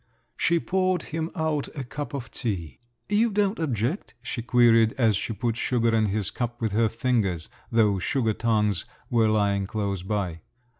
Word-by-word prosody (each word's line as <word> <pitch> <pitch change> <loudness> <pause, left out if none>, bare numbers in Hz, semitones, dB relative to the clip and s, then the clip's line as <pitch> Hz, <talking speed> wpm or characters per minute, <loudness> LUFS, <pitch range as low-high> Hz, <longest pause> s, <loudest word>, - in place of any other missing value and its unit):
She 170 0 +2
poured 185 -1 0
him 160 +1 -3
out 160 -4 0
a 140 - -3
cup 140 +4 -6
of 130 -2 -6
tea. 95 -9 -4 0.3
"You 215 +3 +3
don't 205 0 +1
object?" 135 - -2
she 120 - -4
queried, 115 -2 +5
as 115 -5 +3
she 105 - -2
put 115 +1 -1
sugar 115 -2 +1
in 110 -1 +3
his 100 -1 -1
cup 120 0 -3
with 110 -2 -1
her 110 +2 +2
fingers… 110 -9 0 0.2
though 105 -4 +3
sugar 115 +1 0
tongs 105 -4 +1 0.3
were 115 -2 +4
lying 100 -2 +1
close 100 -3 -2
by. 90 -4 -2
115 Hz, 165 wpm, -26 LUFS, 105-140 Hz, 0.3 s, queried